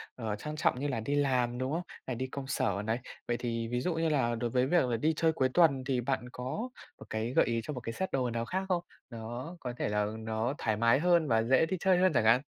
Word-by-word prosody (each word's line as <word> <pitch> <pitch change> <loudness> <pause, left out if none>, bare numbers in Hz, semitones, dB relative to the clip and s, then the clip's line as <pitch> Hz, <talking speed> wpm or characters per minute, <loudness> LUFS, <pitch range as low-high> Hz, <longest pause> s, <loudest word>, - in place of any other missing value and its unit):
ờ, 110 -4 -3
trang 150 +8 -6
trọng 140 -4 +1
như 145 - -1
là 130 -5 -1
đi 140 +6 -1
làm, 125 -4 +1
đúng 130 +2 -2
không? 165 +3 0 0.3
Hay 130 - -2
đi 130 +3 -3
công 135 +1 -6
sở 100 -6 0
này. 110 +2 0 0.3
Vậy 120 - 0
thì 115 -2 -2
ví 120 +1 -1
dụ 180 - 0
như 165 0 +1
là, 125 -6 +1
đối 120 +1 -2
với 125 +2 +2
việc 175 -1 +3
là 120 -2 0
đi 155 +8 +2
chơi 160 +1 +3
cuối 130 -4 +1
tuần 150 -7 +4
thì 130 -1 0
bạn 125 0 -2
có 140 - -4 0.3
một - - -10
cái 110 +3 -2
gợi - - +5
ý 115 -1 0
cho 150 - -4
một 125 - -4
cái 115 -1 -5
set 190 +7 -3
đồ 130 -2 0
nào 115 0 -2
khác 190 +8 -2
không? 175 -2 +1 0.3
Nó 120 +7 -6
có 125 -5 -4
thể - - -1
là 105 0 +1
nó 110 +3 -1
thoải 110 -2 0
mái 115 +4 +4
hơn 170 -1 +3
và 115 -3 +3
dễ 130 +6 +4
đi 185 +3 -2
chơi 190 0 +4
hơn 185 +1 +4
chẳng 115 - +2
hạn? 115 +3 +6
125 Hz, 275 wpm, -31 LUFS, 115-150 Hz, 0.3 s, hạn